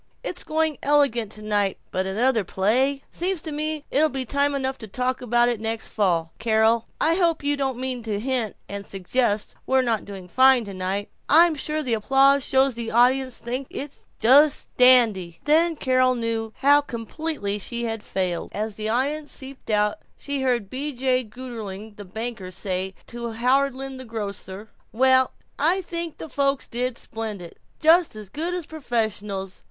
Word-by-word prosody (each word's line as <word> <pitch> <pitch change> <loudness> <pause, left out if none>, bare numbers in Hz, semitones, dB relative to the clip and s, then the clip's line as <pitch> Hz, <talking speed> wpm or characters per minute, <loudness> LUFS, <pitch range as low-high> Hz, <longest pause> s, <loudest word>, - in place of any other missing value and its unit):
It's - - -3
going 315 -1 0
elegant 275 -7 +2
tonight, 210 -2 -1
but 190 +1 -1
another 225 +3 +2
play 255 +10 +1
Seems 365 +1 -1
to 315 - -5
me 305 0 -2
it'll 310 +3 +3
be 270 -2 -3
time 280 +3 +1
enough 265 -1 -2
to 220 - -8
talk 255 +5 -2
about 240 0 +3
that 240 -3 0
next 225 0 -2
fall. 170 -6 0
Carol! 225 +1 +2
I 325 - +3
hope 335 -3 +1
you 290 0 +1
don't 270 -3 -2
mean 255 -1 -3
to 215 -3 -3
hint 245 -2 -1
and 200 0 -5
suggest 205 +3 -1
we're 265 0 +3
not 230 -4 0
doing 195 -3 -9
fine 260 +4 +5
tonight? 195 +1 -3 0.2
I'm 330 +2 +6
sure 305 +1 -2
the 250 -4 -1
applause 270 +5 +4
shows 265 +1 +3
the 235 -1 -4
audience 255 +2 +3
think 255 +3 -3
it's 285 0 -7
just 275 +6 +5
dandy!" 220 -10 +5
Then 325 +3 +3
Carol 255 -2 +2
knew 230 -2 -2
how 285 +1 +6
completely 235 -3 -3
she 235 +4 -4
had 225 -2 -3
failed. 185 -4 -3
As 215 0 -3
the 215 0 -3
audience 285 +6 -1
seeped 270 -2 -9
out 210 -1 +1 0.2
she 285 -1 -4
heard 245 -6 0
B. 280 +7 -4
J. 255 0 +1
Gougerling 220 -3 -8
the 205 - -8
banker 220 -1 -6
say 185 0 -3
to 235 -1 -6
Howland 265 +2 0
the 260 - -8
grocer, 205 -2 -6 0.2
"Well, 260 +2 +4 0.3
I 340 +7 +3
think 340 -2 -4
the - - -7
folks 275 -1 0
did 245 0 -3
splendid; 210 -6 -7 0.2
just 330 -3 +4
as 210 -3 -8
good 335 - -3
as 355 -3 -3
professionals. 215 -9 -3
245 Hz, 170 wpm, -24 LUFS, 215-275 Hz, 0.3 s, I'm